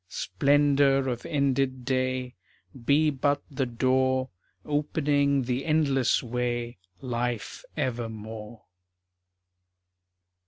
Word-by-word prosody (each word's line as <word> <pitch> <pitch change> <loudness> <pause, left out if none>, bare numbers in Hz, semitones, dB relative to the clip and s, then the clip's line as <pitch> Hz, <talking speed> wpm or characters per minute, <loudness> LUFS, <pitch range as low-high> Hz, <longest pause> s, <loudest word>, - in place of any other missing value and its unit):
Splendor 140 +6 +2
of 120 +5 -4
ended 135 -4 0
day 130 -1 -1 0.5
Be 150 +3 +4
but 145 +1 0
the 135 -1 -1
door 130 +2 +1 0.4
Opening 145 -2 +1
the 125 +2 -2
endless 140 -5 +2
way 120 -2 -2 0.2
Life 120 -2 -3
evermore. 110 -2 -4
130 Hz, 80 wpm, -27 LUFS, 120-140 Hz, 0.5 s, Be